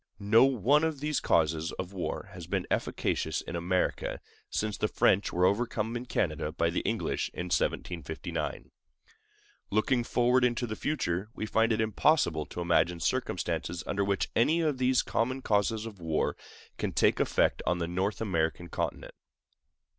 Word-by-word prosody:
No 110 +5 +5
one 135 +4 +3
of 160 -3 -1
these 150 +1 0
causes 80 0 +1
of 95 +1 -6
war 95 - -4
has - - -9
been - - -1
efficacious - - -1
in - - -6
America 90 +2 -1 0.3
since 105 -1 -1
the 105 - 0
French 100 -1 +2
were 90 +1 +2
overcome 115 +2 0
in 120 +1 -5
Canada 80 -8 -1
by 85 +1 0
the - - 0
English - - -1
in - - -3
1759. 80 -3 -2 1.0
Looking 115 +4 +2
forward 125 +2 +2
into 120 -1 +1
the 110 -2 -4
future, 105 - -2
we - - -3
find 115 +1 +2
it 110 - +1
impossible 110 - +2
to 90 - -6
imagine 85 0 +2
circumstances 85 - -2
under 100 0 0
which 100 -1 -1
any 155 +9 +3
of 150 -5 0
these 130 0 +3
common 130 +3 -1
causes 105 +1 +1
of 105 -4 -9
war 80 -2 0 0.4
can - - -2
take - - +3
effect - - +2
on 90 - +2
the 85 -1 -2
North 95 +5 -1
American 85 -4 -1
continent. - - -4
105 Hz, 160 wpm, -29 LUFS, 85-120 Hz, 1.0 s, No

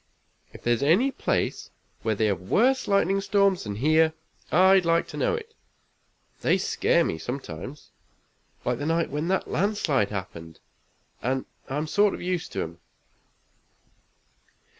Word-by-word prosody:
If - - -13
there's 120 -1 +1
any 185 - +3
place - - -2 0.3
where 110 -1 0
they 110 - +1
have 100 -4 0
worse 250 - +2
lightning 195 -1 +2
storms 200 - +2
than 105 -1 -4
here, 155 +6 +3 0.4
I'd 190 +3 +6
like 170 0 +2
to - - -7
know - - +1
it. 455 0 -8 0.9
They - - +3
scare 170 - +2
me, 80 - -3
sometimes, 125 - -7 0.7
like 125 -1 0
the 145 - -3
night 165 0 0
when 150 +3 -2
that 190 +1 0
landslide 165 - +1
happened, 85 -5 -7 0.6
and 130 +2 -1 0.2
I'm 145 +4 -2
sort 205 +5 +2
of - - -9
used 180 -2 -2
to - - -1
'em. 85 +1 -9
155 Hz, 140 wpm, -26 LUFS, 115-195 Hz, 0.9 s, I'd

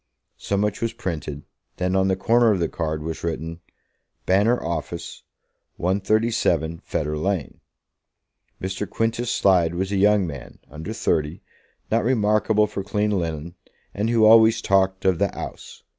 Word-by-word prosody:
So 100 - -1
much 105 0 -1
was 115 -1 -1
printed. 75 -5 -5 0.3
Then, 90 +1 0
on 95 0 +3
the 95 - +2
corner 115 +4 +3
of 100 - +2
the 85 - +1
card 80 -2 -3
was 80 0 -5
written, 80 0 -4 0.7
"Banner 105 +6 +3
Office, 85 0 -5 0.5
137, 95 -4 0
Fetter 75 0 -3
Lane." 90 -1 -2 1.0
Mr. 95 +2 -4
Quintus 115 +1 -1
Slide 85 -6 +3
was 95 +2 -2
a 100 - 0
young 105 0 +4
man, 70 -6 -8
under 80 +6 -7
thirty, 80 -6 -1 0.5
not 115 +1 +2
remarkable 105 -2 +2
for 100 - -5
clean 105 +2 0
linen, 85 -3 -3 0.4
and 105 +3 -1
who 115 -2 +4
always 110 0 +7
talked 95 -2 +1
of 95 -3 +3
the - - +2
"'Ouse." - - -8
95 Hz, 145 wpm, -23 LUFS, 85-105 Hz, 1.0 s, always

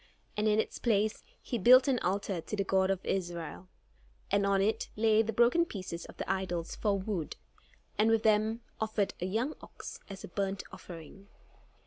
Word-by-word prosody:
And 210 +1 +1
in 215 0 +3
its - - -2
place 215 -2 +1 0.2
he 240 - -3
built 255 +6 +8
an 260 -3 +2
altar 195 -2 -1
to 210 - -4
the 200 - 0
God 190 0 +2
of 190 -1 -1
Israel; 175 -2 -3 0.6
and 200 0 +3
on 195 0 +3
it 205 +3 +1
laid 220 0 +3
the - - +1
broken 240 +9 +4
pieces 185 - -6
of - - -13
the - - -4
idols 180 -3 -2
for 205 -2 +1
wood, 190 -5 -3 0.6
and 215 +1 +5
with 225 -1 +3
them 220 +1 +3 0.2
offered 215 -2 0
a 180 - 0
young 230 +10 0
ox - - -9
as 195 -1 -8
a - - -6
burnt 195 +1 -2
offering. 175 +3 -11
200 Hz, 180 wpm, -31 LUFS, 190-220 Hz, 0.6 s, built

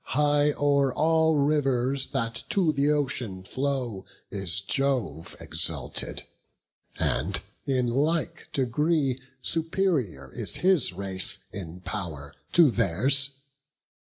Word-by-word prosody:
High 145 0 +3
o'er 140 -2 +2
all 160 +2 +2
rivers, 135 -2 +1
that 115 0 -3
to 175 -6 +2
th' 140 +1 +1
ocean 125 -10 -1
flow, 130 -4 -2 0.3
Is 95 -2 +2
Jove 105 - -1
exalted; - - -2 0.7
and 75 +11 0 0.3
in 130 -3 +1
like 150 +7 -1
degree 135 +1 0 0.2
Superior 155 - 0
is - - 0
his 185 - +4
race 95 0 +2
in 90 -2 -7
pow'r 80 -8 -6 0.2
to 165 -6 +6
theirs. 130 +9 +2
135 Hz, 100 wpm, -26 LUFS, 100-145 Hz, 0.7 s, to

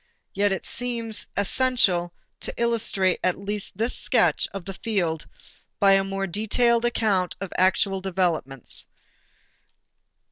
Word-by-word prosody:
Yet 205 0 +2
it 190 - -3
seems 230 -3 -1
essential 200 -5 +2 0.3
to - - -4
illustrate 225 -5 +1
at 185 - +2
least 200 -1 -4
this 230 +3 0
sketch - - +2
of 195 -3 -7
the 195 - -6
field 180 -7 -2 0.5
by 200 -1 +5
a 195 0 +5
more 195 0 -3
detailed 230 +5 +2
account 210 -6 +1
of 195 -1 -6
actual 190 +1 +2
developments. 175 -9 -2
195 Hz, 120 wpm, -24 LUFS, 185-225 Hz, 0.5 s, by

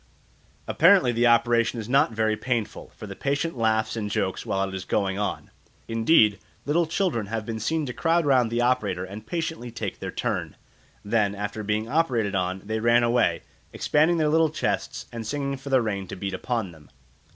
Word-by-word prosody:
Apparently 170 -6 +5
the 120 +1 +2
operation 120 0 +3
is 110 - -6
not 130 -2 +3
very 110 -1 0
painful, 115 0 -3
for - - -9
the - - -8
patient 140 +3 -1
laughs 110 -2 +1
and 105 -2 -3
jokes 95 -2 -2
while 95 0 0
it 95 - -8
is 95 -1 -4
going 95 0 -1
on. 105 -1 -3 0.4
Indeed, 115 - +4 0.3
little 160 +3 +1
children 160 - -1
have 110 0 -4
been 110 0 -4
seen 155 +7 -1
to 125 - -5
crowd 165 +2 +1
round 130 -5 +3
the 120 +1 0
operator 105 -7 0
and 105 +3 -10
patiently 165 -7 -3
take 110 -4 -5
their - - -5
turn; - - -3 0.5
then 105 -1 +1
after 105 +2 -4
being 105 +1 -1
operated 125 -8 +1
on, 95 0 -2
they 110 +1 -2
ran 120 +1 +4
away, 120 +1 +2 0.3
expanding 160 +3 +2
their 155 -2 +2
little 160 +1 +3
chests 155 - -3
and 115 -2 -6
singing 140 +1 -2
for 135 +1 -9
the 130 -3 +3
rain 100 -3 -3
to - - -7
beat 95 +1 -4
upon 110 -1 -2
them. 75 -4 -17
115 Hz, 190 wpm, -25 LUFS, 105-140 Hz, 0.5 s, Apparently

